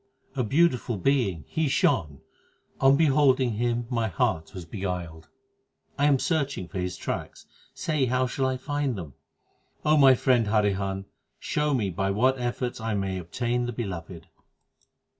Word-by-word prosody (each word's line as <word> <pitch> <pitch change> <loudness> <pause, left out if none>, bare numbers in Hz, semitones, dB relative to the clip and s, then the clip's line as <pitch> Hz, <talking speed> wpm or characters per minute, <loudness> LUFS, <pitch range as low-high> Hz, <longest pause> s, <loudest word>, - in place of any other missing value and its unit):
A 130 - 0
beautiful 125 -3 +2
Being 100 - 0
He 160 -1 0
shone; 75 - +1 0.6
on 135 +1 +6
beholding 135 -4 +3
Him 120 +2 -1
my 115 -2 0
heart 110 -11 -1
was 90 -4 -8
beguiled. 90 -4 -5 0.7
I 145 +1 +2
am 140 -2 +4
searching 140 - -1
for 95 - -5
His 90 -1 -3
tracks: - - -5 0.3
say 155 -4 0
how 130 +1 +1
shall 130 +1 -1
I 130 0 -1
find 145 -1 -2
them? 80 -7 -7 0.7
my 145 -4 +6
friend 125 -3 +2
Harihan, 100 -2 0 0.3
show 150 -1 0
me 105 -6 0
by 95 +3 -1
what 130 +6 +2
efforts 120 0 -3
I 110 -1 -1
may 95 -2 -2
obtain 120 +8 -2
the 120 - -4
Beloved. 90 -7 -6
120 Hz, 145 wpm, -26 LUFS, 95-135 Hz, 0.7 s, on